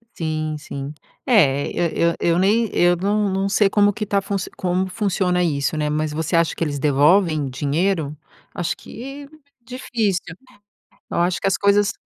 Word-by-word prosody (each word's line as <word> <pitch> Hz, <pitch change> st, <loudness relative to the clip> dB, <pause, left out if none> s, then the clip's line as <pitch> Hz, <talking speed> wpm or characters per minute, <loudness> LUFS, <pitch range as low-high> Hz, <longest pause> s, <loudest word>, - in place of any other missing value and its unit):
Sim 155 Hz, -1 st, -3 dB
sim. 140 Hz, -1 st, -7 dB, 0.3 s
É, 145 Hz, -, +3 dB
eu 170 Hz, 0 st, +1 dB
eu -, -, -5 dB, 0.2 s
eu 170 Hz, -, +1 dB
nem 215 Hz, +4 st, +2 dB
eu 175 Hz, 0 st, +4 dB
não 205 Hz, +3 st, 0 dB
não 195 Hz, +1 st, 0 dB
sei 200 Hz, 0 st, +3 dB
como 205 Hz, 0 st, +3 dB
que 210 Hz, -, -4 dB
tá 200 Hz, -1 st, 0 dB, 0.4 s
como 185 Hz, +1 st, 0 dB
funciona 185 Hz, -3 st, 0 dB
isso, 150 Hz, -3 st, 0 dB
né, 150 Hz, -1 st, 0 dB
mas 155 Hz, 0 st, -1 dB
você 160 Hz, +3 st, -2 dB
acha 165 Hz, -1 st, +2 dB
que -, -, -13 dB
eles 145 Hz, -3 st, -2 dB
devolvem 150 Hz, +1 st, +3 dB
dinheiro? 150 Hz, +3 st, -1 dB, 0.4 s
Acho 175 Hz, -, -2 dB
que, 275 Hz, +4 st, -10 dB, 0.3 s
difícil. 225 Hz, -6 st, -2 dB, 0.9 s
Eu -, -, -2 dB
acho 175 Hz, 0 st, 0 dB
que -, -, 0 dB
as 195 Hz, -, +1 dB
coisas 200 Hz, +1 st, +3 dB
175 Hz, 165 wpm, -21 LUFS, 155-200 Hz, 0.9 s, eu